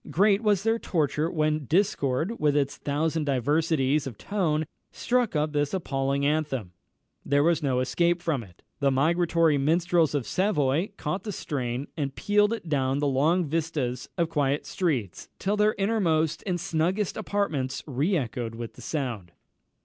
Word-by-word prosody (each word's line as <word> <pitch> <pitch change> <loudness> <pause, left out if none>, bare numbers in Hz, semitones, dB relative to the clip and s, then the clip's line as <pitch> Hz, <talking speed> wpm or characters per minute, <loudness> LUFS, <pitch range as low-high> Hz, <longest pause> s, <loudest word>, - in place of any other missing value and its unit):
great 200 +3 +3
was 205 -4 +2
their 225 +1 +1
torture 155 -3 0
when 155 -3 0
discord, 170 - 0
with 150 -1 +2
its 140 -1 0
thousand 155 +2 -1
diversities 145 +1 +1
of 120 -6 -7
tone, 160 -7 0 0.3
struck 245 -6 0
up 150 0 0
this 145 +3 0
appalling 140 -5 -1
anthem 145 - -1 0.5
there 145 0 +2
was 170 0 +2
no 130 -4 +1
escape 170 +8 +1
from 160 -7 -1
it. 90 -6 -16 0.2
The 140 - +3
migratory 165 +2 +2
minstrels 165 +2 +2
of 135 -5 -1
Savoy 170 -3 +1
caught 155 +6 -3
the 210 - -5
strain, 130 -7 -3
and 140 -4 -3
pealed 210 +1 +2
it 230 -7 -4
down 135 -3 +1
the 145 - 0
long 150 +6 +2
vistas 145 -5 -2
of 170 -2 +2
quiet 145 -2 0
streets, 130 - -2
till 200 +2 0
their 210 +1 +2
innermost 185 -7 +1
and 180 -2 0
snuggest 180 +3 0
apartments 160 -12 -2
re 150 +7 0
echoed 120 -4 -3
with 115 0 -6
the - - -13
sound. 120 - -4
155 Hz, 155 wpm, -26 LUFS, 135-175 Hz, 0.5 s, great